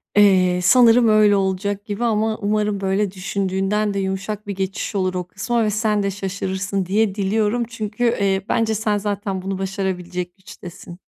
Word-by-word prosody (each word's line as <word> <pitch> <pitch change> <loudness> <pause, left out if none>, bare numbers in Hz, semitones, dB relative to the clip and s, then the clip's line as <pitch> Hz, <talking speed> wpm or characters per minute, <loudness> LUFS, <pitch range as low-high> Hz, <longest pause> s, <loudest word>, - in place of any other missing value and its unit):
Eee, 185 -3 +4
sanırım 235 +4 +6
öyle 215 -1 +5
olacak 195 +1 -1
gibi 210 +1 -4
ama 220 -1 +1
umarım 210 -1 -1
böyle 195 +1 0
düşündüğünden 195 +2 -1
de 200 - -1
yumuşak 195 +2 -4
bir 200 - -4
geçiş 195 +2 -3
olur 185 -2 0
o 180 -1 -4
kısma 230 +5 -1
ve 215 - +1
sen 210 0 0
de 200 - 0
şaşırırsın 195 0 -3
diye 200 +1 +1
diliyorum. 210 +3 0
Çünkü, 220 0 -4
eee, 195 -5 +1
bence 225 -1 +1
sen 210 0 0
zaten 200 -2 -3
bunu 195 +1 -3
başarabilecek 185 -2 -4
güçtesin. 180 -2 -11
200 Hz, 160 wpm, -21 LUFS, 190-215 Hz, -, sanırım